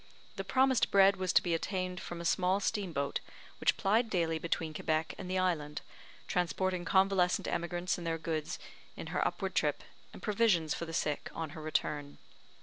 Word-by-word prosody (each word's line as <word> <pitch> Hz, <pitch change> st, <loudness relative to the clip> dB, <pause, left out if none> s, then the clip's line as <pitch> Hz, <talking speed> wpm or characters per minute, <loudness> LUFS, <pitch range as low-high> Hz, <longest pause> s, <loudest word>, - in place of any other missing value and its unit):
The 195 Hz, -, -3 dB
promised 260 Hz, +5 st, +3 dB
bread 195 Hz, 0 st, +6 dB
was 185 Hz, -1 st, 0 dB
to -, -, +5 dB
be 175 Hz, -, 0 dB
obtained 185 Hz, +1 st, -2 dB
from 175 Hz, -, -6 dB
a -, -, -6 dB
small 185 Hz, +3 st, +2 dB
steam 205 Hz, -3 st, -1 dB
boat, 140 Hz, -2 st, -1 dB, 0.4 s
which -, -, +3 dB
plied 220 Hz, +4 st, +2 dB
daily 165 Hz, -5 st, 0 dB
between 160 Hz, -1 st, -2 dB
Quebec 155 Hz, +1 st, -1 dB
and 185 Hz, -, -6 dB
the 185 Hz, -, 0 dB
island, 155 Hz, -5 st, 0 dB, 0.5 s
transporting 180 Hz, 0 st, 0 dB
convalescent 190 Hz, -2 st, +3 dB
emigrants 175 Hz, +1 st, -1 dB
and 170 Hz, -, -5 dB
their 165 Hz, 0 st, 0 dB
goods 160 Hz, -1 st, -3 dB, 0.4 s
in -, -, -6 dB
her -, -, +2 dB
upward -, -, -3 dB
trip, -, -, +1 dB, 0.3 s
and -, -, -11 dB
provisions 200 Hz, -7 st, +2 dB
for 170 Hz, -, -4 dB
the 165 Hz, -, -7 dB
sick 150 Hz, -2 st, -1 dB
on 160 Hz, -2 st, -4 dB
her 160 Hz, -1 st, -8 dB
return. 150 Hz, -2 st, -2 dB
175 Hz, 180 wpm, -32 LUFS, 160-190 Hz, 0.5 s, bread